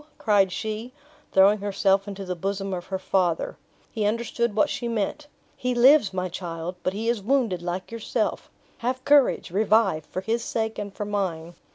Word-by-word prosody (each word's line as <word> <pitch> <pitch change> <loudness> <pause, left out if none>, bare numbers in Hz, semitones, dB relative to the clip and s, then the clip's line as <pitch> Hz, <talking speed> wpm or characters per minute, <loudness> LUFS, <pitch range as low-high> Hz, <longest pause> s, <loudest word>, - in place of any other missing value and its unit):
cried 200 -3 +3
she, 220 +5 -4 0.4
throwing 195 +2 +5
herself 195 0 +1
into 200 -1 -6
the 180 0 -3
bosom 195 +2 -3
of 175 -1 -5
her 190 - -2
father. 180 -3 0 0.4
He 220 - -2
understood 230 +1 0
what 295 - +4
she 245 -4 -3
meant. 230 +6 -2 0.3
"He 250 0 -2
lives, 255 -2 +6
my 185 -1 -2
child! 175 -1 -5
but 185 - -1
he 220 +3 -3
is 235 -3 +1
wounded 225 -5 +1
like 180 +3 -4
yourself. 230 -2 -2 0.3
Have 255 +2 -2
courage; 285 -10 +4
revive, 200 -5 +2
for 185 - -4
his 230 +4 -1
sake 220 -2 -2
and 205 -1 -5
for 210 - -5
mine!" 180 -5 -3
205 Hz, 175 wpm, -25 LUFS, 185-230 Hz, 0.4 s, lives